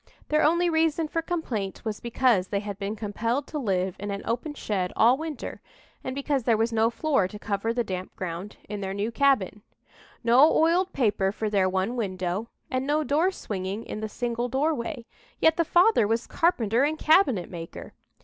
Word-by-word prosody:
Their 305 0 +3
only 340 +3 +3
reason 320 -1 +1
for 330 +2 -1
complaint 240 - -4
was 215 -2 -3
because 235 -5 +2
they 200 0 -1
had 205 -1 -6
been 200 +1 -3
compelled 230 +5 -2
to 300 - -5
live 190 -6 -1
in 205 +1 -5
an 200 0 -4
open 295 +6 -3
shed 190 -8 -2
all 240 +3 +5
winter, 310 -1 -6 0.4
and 260 - -4
because 280 -1 0
there 225 -1 +2
was 225 +1 0
no 225 0 +3
floor 270 - +1
to 210 - -9
cover 205 +1 -2
the 240 +1 0
damp 185 -3 -5
ground 185 +2 -6
in 205 0 -5
their 195 0 -3
new 205 +3 -2
cabin 230 -6 +2 0.6
no 250 +7 +6
oiled 350 +4 +3
paper 205 -6 +1
for 215 +1 -3
their 190 -2 +3
one 190 +6 -1
window, 185 -1 -2 0.2
and 255 +1 -1
no 300 +1 +2
door 305 +6 +2
swinging 200 - -5
in - - -5
the 220 0 -4
single 240 +1 -2
doorway 265 -2 -1 0.3
yet 320 0 +4
the 335 - +2
father 350 - +4
was 230 +2 0
carpenter 240 - +1
and 305 +2 0
cabinet 300 - +3
maker! 165 -2 -8
230 Hz, 190 wpm, -26 LUFS, 200-295 Hz, 0.6 s, no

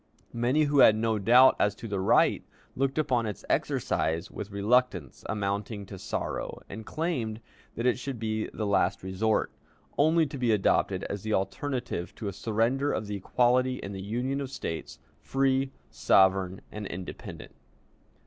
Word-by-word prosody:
Many 125 +6 +2
who 145 -1 +2
had 110 - +8
no 110 0 0
doubt 125 +6 +6
as 105 -1 +2
to 115 - -8
the 100 -2 -2
right, 95 - +3 0.3
looked 135 +1 0
upon 125 -7 +1
its 105 - -6
exercise 80 +4 0
with 100 - -6
reluctance 100 - 0
amounting 100 0 -2
to 95 -1 -9
sorrow, - - -4
and 110 +2 -9
claimed 130 -10 -2 0.4
that 115 - -3
it 125 0 +2
should 135 -1 -5
be 110 -1 -2
the 110 - -3
last 100 -2 +1
resort, 100 +4 0 0.5
only 160 +2 +4
to 140 -1 -7
be 120 -2 +2
adopted 95 -2 +2
as 100 - -4
the 110 +1 0
alternative 100 0 -3
to 110 - -5
a 100 - -3
surrender 115 +8 0
of 110 - -2
the 105 0 -4
equality 125 +5 +2
in 100 - -7
the 95 -1 -6
Union 125 +7 -2
of 135 - -4
States, 80 -11 -5 0.2
free, 135 0 +1 0.2
sovereign, 95 -1 +3
and 105 -1 -6
independent. 90 +1 -8
110 Hz, 160 wpm, -28 LUFS, 100-130 Hz, 0.5 s, had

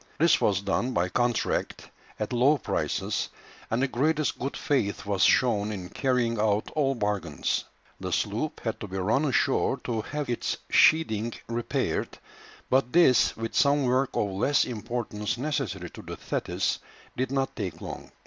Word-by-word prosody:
This 165 +2 +4
was 100 -2 +2
done 110 +6 -1
by 90 -2 +1
contract 120 +2 -1 0.3
at 105 +3 -3
low 135 +5 +4
prices, - - -2 0.4
and 115 - 0
the - - +3
greatest 150 +4 0
good 135 +2 -3
faith 110 -10 0
was 100 -2 -1
shown 105 -2 +3
in 95 -4 -6
carrying 125 -4 0
out 105 0 +1
all 135 -3 +1
bargains. 100 - -1 0.3
The - - -4
sloop - - -1
had - - -3
to - - -6
be 95 - -5
run 110 +11 +1
ashore 135 -1 +2
to 115 -3 -1
have 150 +6 -4
its 120 -1 -1
sheathing 115 -8 +4
repaired, 115 0 -2 0.5
but 130 -1 +2
this, 165 -8 +5
with 115 0 -4
some 140 0 +3
work 130 +1 +1
of 100 - 0
less 120 +10 +2
importance 110 -2 -3
necessary 120 - -3
to - - -10
the - - -8
Thetis, - - -1 0.4
did 130 0 -1
not 135 -1 -1
take 95 -5 -4
long. - - -8
120 Hz, 160 wpm, -27 LUFS, 105-135 Hz, 0.5 s, this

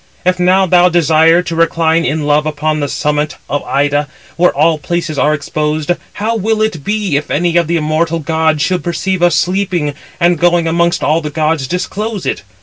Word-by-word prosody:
If 180 0 +1
now 185 +2 +3
thou 180 0 +4
desire 165 0 +3
to 170 -1 -4
recline 165 0 +1
in 150 +2 -1
love 150 +1 +2
upon 155 0 -1
the 145 - -1
summit 150 0 -1
of 145 - -2
Ida, 145 +1 0 0.3
where 175 +1 +3
all 155 +2 +1
places 170 -1 -3
are 150 - +3
exposed, 155 +2 -2 0.2
how 220 +3 -2
will 220 +1 0
it 180 -10 -2
be, 205 -6 -1
if 150 - -4
any 170 +2 0
of 170 -2 +3
the 170 +1 0
immortal 160 +2 0
gods 160 -1 0
should 180 +1 -1
perceive 175 +2 -2
us 175 0 +3
sleeping, 180 -5 0 0.3
and, 175 0 +2
going 175 -1 +2
amongst 170 +1 +1
all 155 +3 +2
the 150 - -4
gods, 155 -2 -1
disclose 200 - -4
it? - - -2
165 Hz, 190 wpm, -14 LUFS, 150-175 Hz, 0.3 s, thou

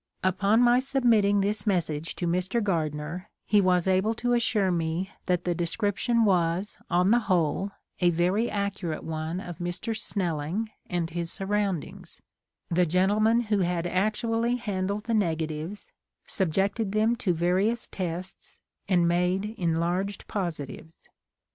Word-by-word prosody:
Upon 200 +4 +3
my 245 +1 +5
submitting 235 -7 +3
this 210 +3 +1
message 165 -5 -1
to 175 - -3
Mr. 180 +6 0
Gardner 165 0 -2 0.2
he 210 -1 +4
was 180 -1 +2
able 190 +4 +2
to 245 +1 0
as 240 - +3
sure 205 -5 +1
me 170 +3 -1 0.2
that 180 -1 +1
the 175 - 0
description 205 +7 +1
was, 180 0 +1
on 180 +3 +3
the 240 - +5
whole, 185 -1 0 0.3
a 175 - +4
very 180 +7 +1
accurate 200 -5 -3
one 160 +2 -3
of 175 -4 -8
Mr. 175 +6 -3
Snelling 185 0 -2 0.2
and 170 -2 -1
his 170 0 -3
surroundings, 195 -3 -3 0.5
the 180 +1 +2
gentleman 210 +7 +3
who 210 -3 0
had 175 -2 0
actually 225 +6 0
handled 205 -3 -2
the 230 - -2
negatives, 165 -1 -2 0.3
subjected 195 +4 0
them 220 +2 +3
to 195 - 0
various 185 +7 +1
tests 180 0 -6 0.3
and 175 -3 +4
made 180 +4 +1
enlarged 175 +2 -1
positives. 160 -4 -5
185 Hz, 135 wpm, -27 LUFS, 170-210 Hz, 0.5 s, my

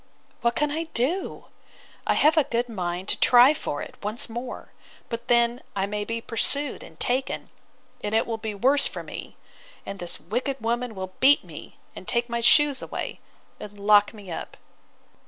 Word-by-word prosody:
—What 235 0 +2
can 295 -1 +1
I 320 +2 -2
do?—I 305 +11 -3
have 305 +2 +5
a 310 - +5
good 240 +1 -1
mind 180 -4 -3
to - - +2
try 250 +4 +7
for 145 - -4
it - - -9
once 210 +3 -1
more; 240 +2 -6 0.4
but 230 0 -5
then 235 0 +3
I 195 -1 +1
may 210 +1 -3
be 230 +1 -3
pursued 280 +5 -1
and - - -13
taken: 260 +2 -1 0.5
and 210 +1 -1
it 225 - +3
will 225 -1 -3
be 220 -2 -4
worse 270 +7 +3
for - - -7
me; - - -9 0.5
and 195 0 -6
this 175 - -5
wicked 245 - -2
woman 235 0 -1
will 185 -1 -6
beat 280 +2 +6
me, - - -11 0.2
and - - -9
take 240 0 0
my 235 0 -1
shoes 295 +2 +5
away, - - -5 0.4
and 205 -1 -9
lock 205 0 +5
me 205 -5 -11
up. - - -6
235 Hz, 175 wpm, -25 LUFS, 210-260 Hz, 0.5 s, try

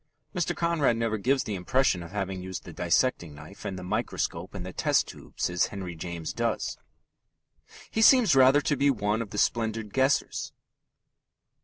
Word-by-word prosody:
Mr. 180 -4 -1
Conrad 165 -8 +2
never 115 -2 -1
gives 130 +5 +1
the 105 - -4
impression 95 +1 +1
of 85 - -8
having 95 -2 -3
used 95 0 -6
the 85 - -10
dissecting 85 - 0
knife 75 +7 -12
and 95 - -4
the 90 - -7
microscope 90 0 -3
and 90 -2 -5
the 95 - -7
test - - +2
tubes - - -5
as 90 -1 +1
Henry 95 -3 -6
James 85 0 -5
does. - - -1 1.2
He 220 - 0
seems 245 - +6
rather 135 +2 +6
to 145 - 0
be 140 +1 +3
one 105 -3 0
of 115 - -5
the 105 - -7
splendid 110 -1 0
guessers. 135 +1 0
105 Hz, 170 wpm, -27 LUFS, 90-130 Hz, 1.2 s, seems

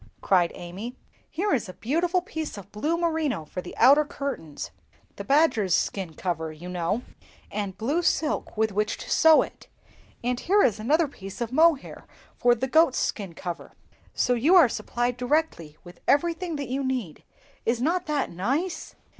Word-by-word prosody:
cried 180 -3 +3
Amy. 195 +8 -7 0.3
"Here 395 +6 -1
is 230 -7 -1
a - - -7
beautiful 340 - 0
piece 320 - -5
of 200 0 -11
blue 300 +11 -1
merino 315 - -1
for 180 - -6
the 180 - -10
outer 285 +3 +7
curtains 275 - -6 0.4
(the - - -6
badgers' 270 - +3
skin 185 -5 -2
cover, 165 -3 -3
you 155 +3 -10
know), 180 +6 -1 0.5
and 200 -3 -4
blue 275 +11 0
silk 310 -8 0
with 220 0 +2
which 210 +2 -1
to - - -8
sew 320 -1 +6
it; - - -12 0.6
and 245 0 0
here 400 +7 +3
is 220 -3 +2
another 300 +9 +2
piece 195 -7 -10
of 235 -1 -3
mohair 315 -1 +2 0.3
for 240 0 +3
the 260 +3 -2
goats' 315 -1 +4
skin 195 -6 -2
cover, 175 0 -6 0.4
so 250 - +1
you 280 +10 +4
are 340 -7 +8
supplied 240 +1 -2
directly 250 - -1
with 175 -1 -13
everything 335 +3 +1
that 280 -4 -4
you 270 +2 -1
need; 250 - -3 0.4
is 230 +1 0
not 330 +8 0
that 295 -2 -1
nice?" 275 - -2
250 Hz, 170 wpm, -26 LUFS, 195-315 Hz, 0.6 s, are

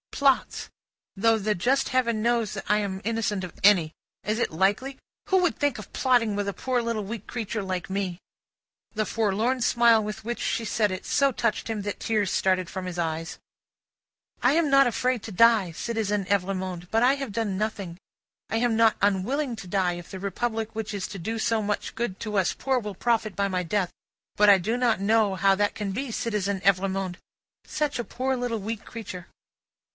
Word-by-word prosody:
"Plots. 275 -2 +1 0.5
Though 225 +3 +3
the 210 +1 +1
just 255 +10 +1
Heaven 235 -4 +1
knows 235 -2 +1
that - - -6
I 210 - +4
am 195 -2 -3
innocent 215 -3 -1
of 180 - -6
any. 185 -6 +5 0.3
Is 215 +1 -1
it - - 0
likely? 200 +11 0 0.3
Who 380 - +4
would 355 -3 +1
think 290 -4 0
of 215 - -11
plotting 240 -5 +2
with 205 0 -2
a 200 - -1
poor 255 +3 -1
little 230 -2 -2
weak 215 +1 -6
creature 225 -2 -3
like 185 -1 -3
me?" 190 -2 -2 0.7
The 215 0 0
forlorn 225 +4 0
smile 235 -1 +4
with 210 +1 -5
which 240 +2 -4
she 230 - -1
said 210 -1 +1
it, 185 +1 -5
so 275 -1 +3
touched 230 -2 -1
him, 220 -2 -2
that 205 0 -4
tears 210 -4 0
started 185 -2 +1
from 190 -1 -5
his 180 -1 -5
eyes. 165 0 -3 1.0
"I 245 - +5
am 325 -2 +2
not 275 0 +6
afraid 250 -1 0
to 220 - -7
die, 215 -2 +4
Citizen 210 +1 -2
Evrémonde, 185 -2 -1
but 225 - +3
I 260 +3 +5
have 275 -5 -5
done 205 -2 -2
nothing. 200 -5 -3 0.5
I 225 - 0
am 235 -1 +2
not 225 -1 +4
unwilling 235 +7 +1
to 195 - -9
die, 180 -1 +1
if 175 0 -9
the 190 - -7
Republic 220 +3 -2
which 220 -1 -4
is 195 - -3
to 195 - -7
do 225 +7 -3
so 225 0 +1
much 205 0 -3
good 225 -5 -3
to 210 -2 -2
us 190 -2 +2
poor, 265 -2 0
will 210 -4 -6
profit 220 -2 0
by 200 +2 +1
my 185 -2 -1
death; 180 +1 -1 0.4
but 210 0 +5
I 200 - +8
do 220 +6 -1
not 240 -4 +2
know 215 0 +3
how 195 +1 +4
that 205 +1 +1
can 205 -2 -3
be, 250 +5 -3
Citizen 205 -4 -1
Evrémonde. 190 -1 +1 0.5
Such 300 -1 -1
a 240 - -2
poor 260 +3 -2
weak 250 - -5
little 225 -3 -2
creature!" 190 -6 -8
215 Hz, 200 wpm, -26 LUFS, 195-235 Hz, 1.0 s, I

